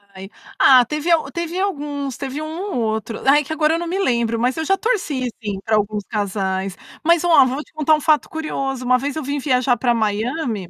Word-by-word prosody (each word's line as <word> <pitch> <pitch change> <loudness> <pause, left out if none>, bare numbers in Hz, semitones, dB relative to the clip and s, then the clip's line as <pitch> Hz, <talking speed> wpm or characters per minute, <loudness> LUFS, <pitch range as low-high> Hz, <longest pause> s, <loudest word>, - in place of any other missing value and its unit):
Ai. 190 +1 -9 0.3
Ah, 255 -2 +7
teve 300 +6 -2
a 335 - +5
teve 340 +1 -4
alguns, 290 - -3
teve 275 +2 -5
um - - -4 0.3
ou 245 - -1
outro, 220 0 -3
ai 295 +2 +5
que 275 - -10
agora 315 0 +2
eu - - -2
não 345 - -4
me 370 +3 -2
lembro, 235 - 0
mas 250 +2 +1
eu 320 - -2
já 390 +4 +2
torci 305 - -1
sim 205 -2 -3
pra 220 - +1
alguns 210 0 -1
casais. 195 -2 -2 0.3
Mas 335 +1 +3
ó, 335 -6 +6
vou 260 +3 -2
te - - -28
contar 310 0 +3
um 305 - -4
fato 305 0 +2
curioso, 270 -5 -4
uma 255 0 +4
vez 275 +2 -4
eu 315 - -3
vim 285 +2 -2
viajar 255 -2 +2
pra 240 0 +1
Miami, 220 - -2
270 Hz, 225 wpm, -20 LUFS, 225-310 Hz, 0.3 s, Ah